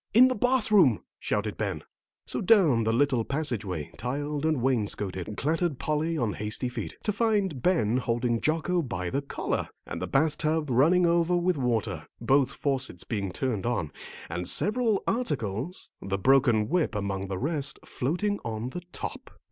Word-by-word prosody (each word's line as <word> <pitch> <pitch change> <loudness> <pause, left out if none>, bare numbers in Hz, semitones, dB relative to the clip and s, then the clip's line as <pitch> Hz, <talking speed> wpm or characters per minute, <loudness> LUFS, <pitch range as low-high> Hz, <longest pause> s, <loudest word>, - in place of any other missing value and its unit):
"In 255 +3 +8
the - - +1
bath 245 0 +2
room," 160 - +5 0.2
shouted 105 0 -2
Ben. 100 -8 -2 0.4
So - - -2
down 170 - +4
the 110 - +2
little 130 -1 +2
passageway, 110 - -2
tiled 145 +4 -2
and 155 -4 +1
wainscoted, 105 -5 -1
clattered 160 0 0
Polly 155 +3 -1
on 115 -7 0
hasty 105 +4 -2
feet, 120 -4 -6
to 210 - +1
find 205 - 0
Ben 125 - +2
holding 120 -1 0
Jocko 165 +3 +1
by 120 - -4
the 140 - 0
collar, 140 - -3 0.2
and - - -6
the - - -2
bath 150 +2 +1
tub 155 -2 0
running 165 +9 +4
over 170 +1 +3
with 175 +1 +1
water, 110 - -1
both 130 +3 +3
faucets 130 -10 -1
being 100 -2 -3
turned 120 +1 -2
on, 85 -11 -1 0.4
and 90 +2 -3
several 220 0 +2
articles, 145 - -2
the 100 0 -2
broken 120 -1 +4
whip 170 -6 0
among 100 -1 -2
the 95 -1 -3
rest, 145 - -2
floating 180 +10 -1
on 115 +2 -4
the 180 - -5
top. - - -6
135 Hz, 165 wpm, -27 LUFS, 110-165 Hz, 0.4 s, In